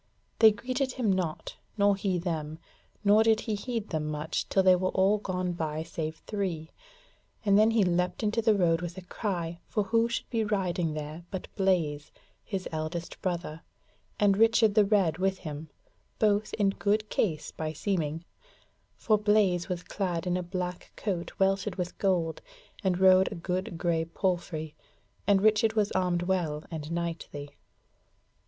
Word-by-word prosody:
They 220 -1 +9
greeted 255 +4 -2
him 225 -6 +1
not, 175 -4 -3 0.2
nor 200 -1 +4
he 195 -2 -1
them, 160 -3 -3 0.5
nor 210 +1 +6
did 220 -1 +3
he 220 - -3
heed 225 +1 -3
them 155 -2 -2
much 155 +1 -3
till 190 - +3
they 185 -1 +7
were 185 +1 0
all 195 +3 +3
gone 180 -3 -2
by 160 -2 -3
save 160 -1 -4
three, 180 -6 -3 0.7
and 200 -1 +4
then 215 +2 +6
he 225 -2 +3
leapt 180 +3 0
into 215 +2 +1
the 220 -1 +4
road 170 -3 +2
with 175 +1 -5
a 185 - -7
cry, 175 -4 -3
for 210 - 0
who 230 +3 +2
should 235 - -3
be 225 -2 +1
riding 180 -6 -1
there 155 +2 -6
but 190 -2 -6
Blaise, 170 -7 0 0.3
his 195 -2 -4
eldest 160 +2 -4
brother, 170 -3 -3 0.6
and 200 -1 +4
Richard 225 -1 +5
the 210 -1 +5
Red 195 -6 +2
with 190 0 +1
him, 155 -2 -7 0.5
both 210 -1 +2
in 200 -2 +2
good 210 +2 0
case 155 -7 -1
by 155 -1 -4
seeming; 165 -2 -2 0.7
for 215 -2 +2
Blaise 205 -4 +2
was 180 -1 -3
clad 180 -3 -2
in 180 0 0
a 180 - 0
black 180 0 -5
coat 185 -5 -4
welted 195 0 +1
with 180 -2 -4
gold, 175 -5 0 0.4
and 185 -2 +1
rode 190 0 +6
a - - -5
good 180 0 -3
grey 165 -1 0
palfrey, 165 -3 -2 0.5
and 200 -1 +4
Richard 215 +1 +4
was 210 -2 +1
armed 180 -2 +1
well 170 -5 -1
and 155 -1 -5
knightly. 165 -4 -4
185 Hz, 165 wpm, -29 LUFS, 165-205 Hz, 0.7 s, They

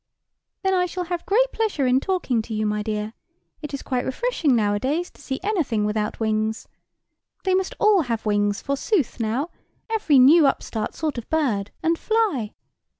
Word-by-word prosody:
"Then 385 0 +2
I 360 -1 +2
shall 360 +1 -4
have 350 0 -4
great - - +3
pleasure 420 -11 0
in 255 +1 +4
talking 300 - 0
to 220 0 -6
you, 215 0 0
my 210 0 0
dear. 210 0 -3 0.5
It 300 - -6
is 280 - -5
quite 255 -2 -1
refreshing 320 - 0
nowadays 235 +11 0
to - - -19
see 265 -1 -4
anything 315 - 0
without 210 0 -2
wings. 220 0 -1 0.8
They 375 - +1
must 380 0 0
all 420 -4 +5
have 230 -6 -3
wings, 205 -1 +1
forsooth, 280 - 0
now, 240 +9 -1 0.4
every 410 -11 +3
new 285 +4 +7
upstart 225 -5 -2
sort 305 -6 -2
of 230 - -11
bird, 240 -11 0
and 330 0 +1
fly. 410 - 0
270 Hz, 170 wpm, -23 LUFS, 220-360 Hz, 0.8 s, new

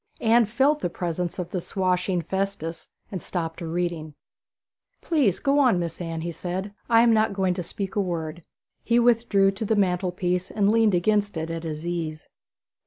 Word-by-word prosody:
Anne 230 -1 +4
felt 270 +7 +2
the 175 - -1
presence 175 0 -3
of 180 -1 -4
the 180 - -2
swashing 180 -1 0
Festus, 190 -4 -3 0.2
and 185 -4 -4
stopped 165 -3 -4
her 170 - -5
reading. 165 -3 -3 0.8
'Please 280 - +2
go 280 +1 +2
on, 250 -9 +4
Miss 170 0 -4
Anne,' 165 -1 -4
he 170 +1 -3
said, 185 +4 -4 0.2
'I 230 0 +6
am 235 -1 +5
not 215 -2 +2
going 190 -2 +1
to 180 - -3
speak 195 +4 -5
a 205 - +2
word.' 170 -3 -3 0.4
He 235 - +2
withdrew 230 -5 +4
to 195 +3 -5
the 220 +1 +1
mantelpiece 180 -1 0
and 205 -1 +2
leaned 220 -3 +4
against 205 +1 +1
it 160 +1 -3
at 165 0 -4
his 155 0 -5
ease. 165 -3 -4
185 Hz, 180 wpm, -25 LUFS, 170-215 Hz, 0.8 s, I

